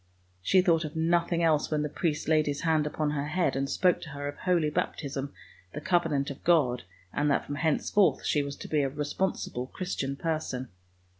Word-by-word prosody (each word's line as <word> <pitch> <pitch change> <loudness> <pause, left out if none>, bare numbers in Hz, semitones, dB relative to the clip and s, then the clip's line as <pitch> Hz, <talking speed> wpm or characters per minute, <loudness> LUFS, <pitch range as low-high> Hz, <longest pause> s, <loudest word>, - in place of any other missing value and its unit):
She 185 - +4
thought 170 -3 +3
of 155 +1 -6
nothing 170 +1 +1
else 155 -2 +3
when 150 -1 0
the - - 0
priest 150 0 -2
laid 155 -1 +3
his 145 -1 -2
hand 160 -2 +2
upon 150 0 -1
her 145 -1 -2
head 155 -3 +1
and 135 0 -1
spoke 180 -2 +2
to 155 - -8
her 145 0 -5
of 145 - -5
holy 170 -4 +1
baptism, 140 -2 -3 0.4
the - - -3
covenant 155 -4 +1
of 140 - -10
God, 140 -8 +3 0.3
and 145 0 +1
that 140 - +1
from - - -5
henceforth 160 +6 +2
she 150 - +2
was 140 0 -4
to - - -9
be 150 -2 +1
a 135 - 0
responsible 145 -3 -2
Christian 140 -5 -3
person. 140 -5 -3
150 Hz, 200 wpm, -28 LUFS, 140-165 Hz, 0.4 s, She